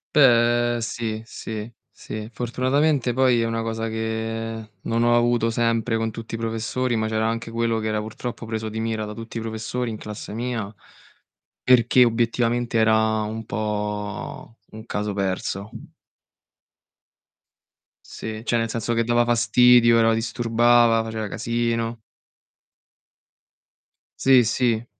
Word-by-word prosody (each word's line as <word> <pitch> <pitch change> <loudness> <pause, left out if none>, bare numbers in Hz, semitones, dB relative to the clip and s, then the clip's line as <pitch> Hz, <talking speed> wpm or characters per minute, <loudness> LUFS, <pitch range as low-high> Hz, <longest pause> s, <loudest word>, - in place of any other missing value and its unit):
Beh, 120 -3 +4
sì, 110 -1 -3
sì, 110 0 -7 0.2
sì. 110 0 -7
Fortunatamente 130 +2 +1
poi 125 -2 +3
è - - +1
una 115 0 -2
cosa 115 0 -3
che 110 0 -4
non 115 +1 0
ho 120 0 +4
avuto 120 -1 +2
sempre 115 0 0
con 115 0 -1
tutti 115 +1 -9
i - - -1
professori, 115 +2 -2
ma 110 0 0
c'era 110 0 0
anche 115 0 -4
quello 115 -1 0
che 110 0 -2
era 105 0 0
purtroppo 115 +1 -6
preso 110 -1 -3
di 110 +1 -5
mira 110 -1 -2
da 105 - -7
tutti 115 0 -8
i - - -1
professori 115 +2 -3
in 110 - -5
classe 105 0 -8
mia, 115 -3 -3 0.9
perché 125 0 +5
obiettivamente 120 0 +1
era 110 0 +3
un 110 +1 -5
po' 105 +1 -4
un 110 0 -10
caso 105 0 -3
perso. 100 +1 -3 2.4
Sì, 110 0 -7
cioè 120 - +1
nel 115 0 -1
senso 115 +1 -2
che 115 - +1
dava 120 +1 +2
fastidio, 120 0 +5
era 115 0 +4
disturbava, 115 0 +3
faceva 110 -1 -4
casino. 115 +1 -2 2.2
Sì, 130 -2 +6
sì. 115 0 0
115 Hz, 135 wpm, -23 LUFS, 110-120 Hz, 2.4 s, Sì